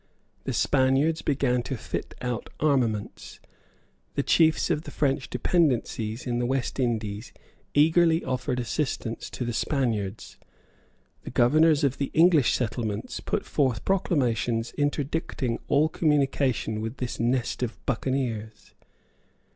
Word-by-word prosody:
The - - -2
Spaniards 135 +4 +2
began 130 -3 +1
to 130 +1 -4
fit - - -5
out 125 -2 -3
armaments. 125 -9 -1 0.8
The - - +1
chiefs 160 +1 +3
of 150 -2 0
the - - -9
French 135 -2 -1
dependencies 125 -6 0
in 120 -1 -1
the 120 - 0
West 135 0 -2
Indies 110 -3 -2 0.4
eagerly 165 +2 +4
offered 125 -1 -2
assistance 120 -1 -3
to 125 - -4
the 120 - -2
Spaniards. 110 -7 -2 0.8
The - - -8
governors 155 +5 +4
of 135 -2 +1
the 140 - -1
English 160 -5 +5
settlements 115 -3 -2
put - - -2
forth 130 -7 0
proclamations 120 - 0
interdicting 145 -4 -1
all 150 +2 +3
communication 135 -8 0
with 115 +4 -5
this 125 -1 -4
nest 120 +2 0
of 120 -2 -3
buccaneers. 115 -5 -3
130 Hz, 125 wpm, -26 LUFS, 115-145 Hz, 0.8 s, English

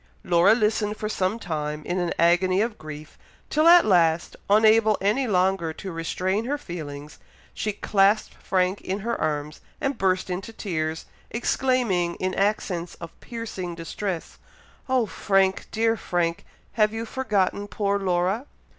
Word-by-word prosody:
Laura 175 +5 +5
listened 210 -2 0
for 215 - -3
some 195 0 -1
time 150 -6 -4
in 180 +1 -1
an 175 -1 -1
agony 175 +2 +3
of 225 +1 -1
grief, 155 0 -10 0.3
till 310 +2 +3
at 350 +1 +8
last, 170 -4 +2
unable 215 +1 +5
any 215 +7 +1
longer 185 -4 +1
to 190 +3 -7
restrain 185 +5 -2
her 285 +4 -1
feelings, 150 - -8 0.3
she 215 - -2
clasped 205 +1 +2
Frank 185 +1 0
in 195 +2 -3
her 235 +3 -1
arms 150 0 -2 0.2
and 275 -4 -2
burst 185 -1 +1
into 190 +5 -4
tears, 160 -7 -3 0.2
exclaiming, 235 -8 0
in 185 0 -2
accents 190 -4 -1
of 170 -1 -9
piercing 215 -7 -6
distress, 170 +1 -5 0.5
"Oh 255 -3 +3
Frank! 195 -2 +1
dear 225 +1 +2
Frank! 175 -5 -2 0.3
have 215 -1 +2
you 225 +1 -4
forgotten 205 -5 -1
poor 200 -1 -1
Laura?" 190 +6 0
195 Hz, 145 wpm, -25 LUFS, 175-220 Hz, 0.5 s, at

